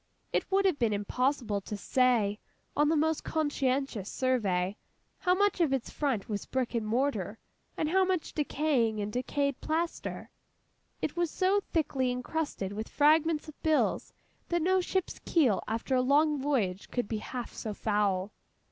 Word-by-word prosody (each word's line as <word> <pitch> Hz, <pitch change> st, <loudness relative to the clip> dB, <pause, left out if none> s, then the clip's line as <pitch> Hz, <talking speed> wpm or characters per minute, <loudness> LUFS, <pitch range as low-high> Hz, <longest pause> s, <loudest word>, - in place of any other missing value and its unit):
It -, -, 0 dB
would 390 Hz, +1 st, +3 dB
have 365 Hz, -7 st, +2 dB
been 230 Hz, -4 st, +2 dB
impossible 220 Hz, +1 st, 0 dB
to 210 Hz, +2 st, -6 dB
say, 225 Hz, -3 st, +2 dB, 0.4 s
on 295 Hz, 0 st, +3 dB
the 325 Hz, -, +3 dB
most 315 Hz, +1 st, +1 dB
conscientious 270 Hz, -, -1 dB
survey, 205 Hz, -8 st, 0 dB, 0.4 s
how 360 Hz, -1 st, +3 dB
much 405 Hz, -1 st, +2 dB
of 315 Hz, -5 st, +3 dB
its 265 Hz, -3 st, -1 dB
front 265 Hz, -9 st, -1 dB
was 205 Hz, -2 st, -4 dB
brick 260 Hz, -2 st, -1 dB
and 225 Hz, -2 st, -1 dB
mortar, 225 Hz, -4 st, 0 dB, 0.4 s
and 310 Hz, -, 0 dB
how 380 Hz, +4 st, +3 dB
much 370 Hz, -3 st, -1 dB
decaying 275 Hz, -7 st, +1 dB
and 205 Hz, 0 st, -3 dB
decayed 280 Hz, +2 st, -1 dB
plaster. 330 Hz, +2 st, -3 dB, 0.7 s
It -, -, -1 dB
was 345 Hz, -1 st, +1 dB
so 385 Hz, +4 st, +2 dB
thickly 270 Hz, -5 st, +1 dB
encrusted 250 Hz, -5 st, -3 dB
with 215 Hz, +2 st, -5 dB
fragments 310 Hz, +1 st, +3 dB
of 310 Hz, -, -12 dB
bills, 315 Hz, -1 st, +1 dB, 0.4 s
that 345 Hz, -2 st, +1 dB
no 375 Hz, +2 st, +3 dB
ship's 375 Hz, 0 st, -2 dB
keel 265 Hz, -, +2 dB
after 225 Hz, +4 st, -2 dB
a 255 Hz, -, +4 dB
long 290 Hz, +2 st, +3 dB
voyage 215 Hz, -10 st, 0 dB
could 245 Hz, -4 st, -2 dB
be 220 Hz, 0 st, -2 dB
half 245 Hz, +2 st, -6 dB
so 220 Hz, -, -5 dB
foul. 205 Hz, -2 st, 0 dB
265 Hz, 160 wpm, -30 LUFS, 220-315 Hz, 0.7 s, a